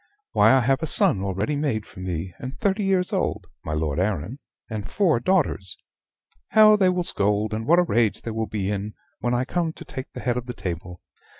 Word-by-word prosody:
"Why, - - +5
I 130 0 +5
have 135 +4 +1
a 160 - -1
son 95 - +5
already 100 +9 -2
made 140 -8 -1
for - - -14
me, 90 -1 -4
and 130 +1 -7
thirty 200 +1 0
years 190 0 +1
old 105 - -1 0.2
(my 75 - -4
Lord 75 0 -1
Arran), 100 - -2 0.3
and 110 -3 -5
four 175 - +2
daughters. 125 - 0 0.7
How 215 -1 +6
they 190 -3 +3
will 180 -1 0
scold, 105 -5 0
and 110 +1 -4
what 170 - +5
a 180 - +5
rage 115 - +1
they 115 - -4
will 110 0 -2
be 100 -1 -2
in, 105 +1 -4 0.2
when 120 0 0
I 125 +1 0
come 165 +2 -1
to - - -11
take 130 -1 -7
the - - -7
head 125 -1 0
of 125 0 -5
the 125 - -6
table! 90 0 -6
115 Hz, 215 wpm, -24 LUFS, 100-160 Hz, 0.7 s, How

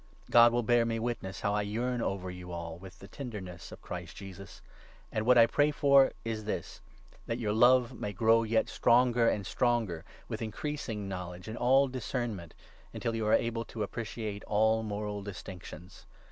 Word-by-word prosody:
God 120 0 +8
will 120 0 +1
bear 120 +1 +4
me 115 0 -1
witness 115 -5 -4
how 100 -1 0
I 105 - +1
yearn 120 +4 -2
over 95 -3 -2
you 90 0 -9
all 85 -1 -6
with 95 0 -12
the - - -12
8 100 - -17
tenderness 100 -10 -7
of - - -12
Christ - - -7
Jesus. 100 0 -10 0.5
And 110 +1 -2
what 125 0 +6
I 115 - +9
pray 145 +5 +2
for 140 -2 +5
is 110 -2 -3
this 105 - -4 0.2
— - - -25
that 115 - -1
9 - - -7
your 105 -2 0
love 125 +2 +5
may 105 -4 -4
grow 115 +3 +4
yet 110 0 +1
stronger 120 -1 +3
and 100 -2 -2
stronger, 115 -9 0 0.2
with 110 -1 -5
increasing 110 -2 -4
knowledge 90 -1 -6
and 110 - -5
all 135 +3 +4
discernment, 120 - -4 0.4
until 115 - -2
you 110 -1 -1
are - - +3
able 115 0 +1
to 110 - -4
appreciate 110 -1 -5
10 - - -21
all 110 +1 +3
moral 105 -1 -4
distinctions. 90 -3 -10
110 Hz, 190 wpm, -30 LUFS, 100-120 Hz, 0.5 s, I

